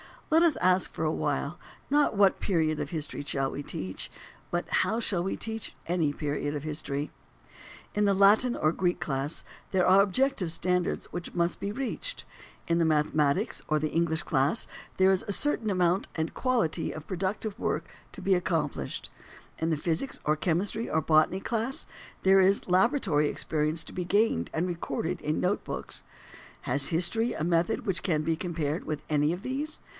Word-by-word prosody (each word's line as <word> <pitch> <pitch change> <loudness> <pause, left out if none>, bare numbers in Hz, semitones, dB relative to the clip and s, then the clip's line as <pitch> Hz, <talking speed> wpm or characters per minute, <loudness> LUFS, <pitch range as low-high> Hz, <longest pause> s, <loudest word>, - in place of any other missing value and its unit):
Let 320 +1 +6
us 330 -5 +4
ask 185 0 +2
for - - -3
a 155 - +2
while, 145 +2 -2 0.3
not 290 -4 +3
what 200 -1 +4
period 160 -5 +1
of - - -3
history 155 -4 -2
shall 135 -2 -1
we - - -5
teach? 95 -7 -4 0.4
but, 175 0 -2
how 225 - +1
shall 190 -6 +1
we 190 - -2
teach 225 -1 -5
any 165 -4 +1
period 145 0 -2
of 145 - -4
history? 150 -2 -3 0.8
In 210 0 +2
the 200 - +4
Latin 205 +6 +5
or 155 - +2
Greek 180 0 0
class 145 0 -1 0.3
there 185 -2 +3
are 190 +2 +7
objective 205 -2 +1
standards 180 +1 0
which 175 0 -6
must 170 0 0
be 200 +1 -3
reached; 275 - -3 0.4
in 170 0 +2
the 165 - +3
mathematics 150 -2 +1
or 155 - +2
the 155 0 -1
English 165 -1 +1
class 145 - +2 0.3
there 190 0 +5
is 190 - +1
a 205 - +2
certain 235 -3 +2
amount 180 0 +2
and 160 0 -2
quality 245 -11 0
of 155 - -8
productive 195 +3 -3
work - - -2 0.2
to - - -8
be 195 - +2
accomplished; 165 - -1 0.5
in 160 - 0
the 160 - +1
physics 170 - -2
or 150 - +2
chemistry 190 +8 0
or 160 - +1
botany 155 +5 +3
class 235 +5 -1 0.4
there 190 0 +6
is 190 0 +3
laboratory 185 - +3
experience 155 +2 0
to - - -11
be 180 - -3
gained 210 +5 +2
and 160 +3 0
recorded 170 -1 -3
in 150 +1 -1
note 185 +3 0
books. - - -5 0.6
Has 140 +2 +2
history 205 +8 +1
a - - -3
method 170 0 +1
which 185 -3 0
can 155 -5 0
be 165 0 0
compared 165 -3 -2
with 155 -1 -4
any 150 +1 +2
of 180 - -7
these? 290 +4 -3
175 Hz, 180 wpm, -28 LUFS, 155-200 Hz, 0.8 s, are